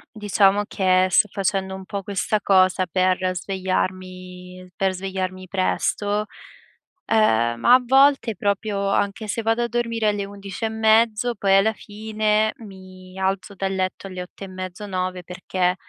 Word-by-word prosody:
diciamo 205 -1 +2
che 185 -1 +2
sto 210 - +4
facendo 190 -1 -1
un 190 0 -9
po' 200 +1 -4
questa 200 +2 -1
cosa 185 -1 +3
per 185 +2 +1 0.2
svegliarmi 185 -1 -4
per 190 -1 0
svegliarmi 185 0 -4
presto, 205 +2 -1 0.9
uhm, 120 - +3
ma 240 - +5
a 255 - +2
volte 270 -2 +4
proprio 200 +1 -1
anche 200 +2 -1
se 220 +2 -2
vado 225 +2 +1
a - - 0
dormire 230 -1 -1
alle 205 -1 -2
11 200 +1 -6
e - - 0
mezzo, 220 +1 +2
poi 195 -1 +2
alla 205 +3 +4
fine 215 0 -1
mi 185 -3 -13
alzo 190 +1 -2
dal 195 0 -2
letto 185 +1 -3
alle 185 -1 -6
8 180 - -13
e - - -10
mezzo, 185 +2 -7
9 185 -1 -3
perché, 180 0 -1
195 Hz, 150 wpm, -22 LUFS, 185-215 Hz, 0.9 s, ma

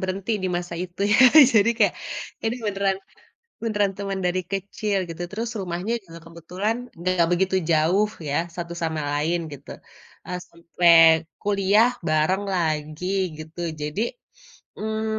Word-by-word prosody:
berhenti 190 +3 -3
di - - +1
masa 175 -1 -5
itu 180 +1 -9
ya. - - +5 0.4
Jadi 215 0 +5
kayak, - - +3 0.5
ini 225 - 0
beneran 195 -1 0 0.7
beneran 205 -3 +1
teman 195 -1 -3
dari 185 +1 0
kecil 200 +1 -2
gitu. 165 +1 -6
Terus 225 +3 -3
rumahnya 180 +4 -3
juga 165 -2 -12
kebetulan 180 +7 -3 0.2
nggak 175 -1 +1
begitu 190 +2 +1 0.2
jauh 175 +7 +3 0.2
ya 140 - -1 0.2
satu 170 0 -5
sama 160 -1 -1
lain 160 +4 0
gitu, 140 0 -11 0.6
eee, 180 0 -4
sampai 170 0 +2 0.5
kuliah 205 +3 +3 0.2
bareng 155 +6 +2
lagi 155 0 -2 0.3
gitu. 155 +2 -11 0.2
Jadi, 150 +7 -3 0.8
mmm, 220 0 -3
185 Hz, 135 wpm, -24 LUFS, 170-200 Hz, 0.8 s, ya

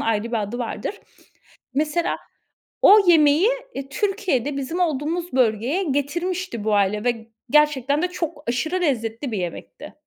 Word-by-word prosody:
ayrı 220 -1 0
bir 230 -2 -1
adı 205 +4 -5
vardır. 250 - -4 0.7
Mesela 305 +4 0 0.7
o 420 - +8
yemeği, 320 +3 +5 0.2
eee, 275 0 -6
Türkiye'de 300 - -1
bizim 280 +6 -3
olduğumuz 335 +2 -1
bölgeye 250 - +1
getirmişti 310 - -2
bu 215 0 0
aile 205 +2 +1
ve 230 -2 -1 0.2
gerçekten 295 0 +3
de 360 - +1
çok 335 -4 -5
aşırı 315 +10 -1
lezzetli 240 -4 -1
bir 215 - -2
yemekti. 180 - -6
285 Hz, 135 wpm, -22 LUFS, 235-340 Hz, 0.7 s, o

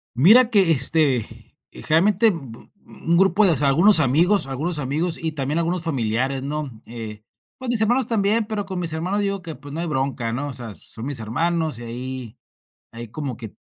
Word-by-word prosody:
Mira 225 - +6
que, 195 -6 +4
este, 135 -4 +3 0.5
generalmente, 195 +7 +2
bu 165 -9 -5
bu 115 - -15
un 170 +1 -1
grupo 195 +2 +4
de, 180 - +5
o 160 - +3
sea, 145 -1 +2
algunos 170 +6 +5
amigos 165 +8 +3
algunos 150 +5 -2
amigos 155 +5 -1
y 160 -1 -2
también 145 +1 -3
algunos 170 +1 -1
familiares, 130 -2 -1
¿no?, 150 0 -4 0.2
eh, 110 -2 -8 0.3
pues, 260 -1 -6
mis 235 -3 +1
hermanos 240 +2 +2
también, 215 0 +1
pero 210 -2 -4
con 190 -1 -6
mis 170 -2 -1
hermanos 185 +6 -2
digo 200 -1 -2
que: 165 -5 -8
"Pues, 145 +2 -12
no 160 - -4
hay 170 - -2
bronca", 130 -5 -2
¿no? 145 +3 -3
O - - -6
sea, 115 -4 -7
son 115 +3 -9
mis 140 -4 -4
hermanos, 155 +5 -1
y 120 - -8
ahí, 125 0 -7 0.5
hay 115 -1 -9
como 135 -3 -5
que 110 -3 -9
155 Hz, 200 wpm, -22 LUFS, 130-185 Hz, 0.5 s, Mira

